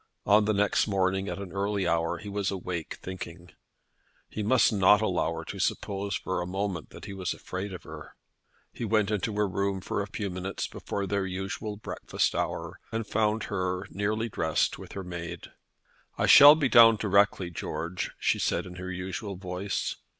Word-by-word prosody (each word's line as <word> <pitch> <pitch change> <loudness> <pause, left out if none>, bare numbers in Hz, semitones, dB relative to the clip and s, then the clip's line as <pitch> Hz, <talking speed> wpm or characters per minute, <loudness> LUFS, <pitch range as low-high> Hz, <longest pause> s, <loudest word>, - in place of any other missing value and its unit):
On 105 +1 +5
the 110 - +2
next 100 +1 +2
morning 95 0 0
at - - -4
an 100 -2 -7
early 100 0 -1
hour 85 +1 +1
he 105 - -10
was 100 -1 -1
awake 90 -4 -4
thinking. 90 -1 -8 0.8
He 110 - -5
must 115 +2 +4
not 100 +1 +6
allow 95 -6 0
her 80 - -5
to - - -7
suppose 100 0 -1
for 95 - -2
a 90 - -4
moment 95 -3 -3
that - - -11
he 100 - -7
was 95 -3 -3
afraid 95 +2 -5
of 90 - -8
her. 80 -1 -10 0.6
He - - -6
went 110 -2 +2
into 105 +1 -1
her 105 0 +2
room 100 0 -1
a 100 - -1
few 100 -1 -4
minutes 95 +2 -4
before 100 - -4
their 95 0 -1
usual 95 +3 -4
breakfast 110 - -2
hour, - - -3
and 115 0 -2
found 105 +1 +1
her, 90 -1 -2
nearly 110 +3 -1
dressed, 80 -7 0
with - - -10
her 95 - -5
maid. 85 -2 -7 0.7
"I - - +2
shall 145 +2 +10
be 150 -3 +1
down 115 -2 +8
directly, 100 -3 +2
George," 85 +1 -4
she - - +1
said - - 0
in 90 -1 -9
her 95 0 -5
usual 95 +2 -5
voice. 90 +1 -3
100 Hz, 180 wpm, -28 LUFS, 90-105 Hz, 0.8 s, shall